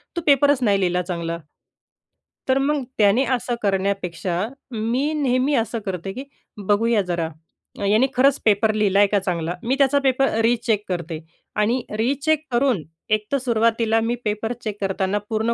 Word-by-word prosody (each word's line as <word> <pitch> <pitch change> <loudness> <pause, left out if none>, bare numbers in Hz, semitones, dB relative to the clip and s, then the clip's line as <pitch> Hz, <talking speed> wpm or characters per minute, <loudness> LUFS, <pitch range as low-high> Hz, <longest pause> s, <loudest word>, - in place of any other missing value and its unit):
"तू 340 - -1
पेपरच 285 -1 +4
नाही 200 -3 +3
लिहिला 180 0 +1
चांगला." 170 -2 -4 1.1
तर 260 - +4
मग 285 0 0
त्याने 215 +5 +4
असं 240 0 -3
करण्यापेक्षा 190 -2 -1 0.2
मी 240 +6 -1
नेहमी 270 -1 +1
असं 225 0 -1
करते, 190 0 -4
की 260 +5 -6 0.4
बघूया 220 +1 +3
जरा, 170 -3 -2 0.6
याने 220 +6 +4
खरंच 270 +2 +3
पेपर 215 0 +3
लिहिला 200 -2 +2
आहे 205 - +6
का 205 0 +1
चांगला. 175 -3 -2
मी 255 +3 +1
त्याचा 280 0 +3
पेपर 270 0 +2
रिचेक 230 -2 +1
करते 170 -3 -4 0.4
आणि 230 +4 +1
रिचेक 285 +6 +1
करून 240 - +1 0.3
एक 215 0 +1
तर 280 - +3
सुरुवातीला 230 -2 +1
मी 230 +2 0
पेपर 215 +3 -1
चेक 210 -2 -4
करताना 195 +1 0
पूर्ण 220 +1 0
220 Hz, 155 wpm, -22 LUFS, 195-255 Hz, 1.1 s, आहे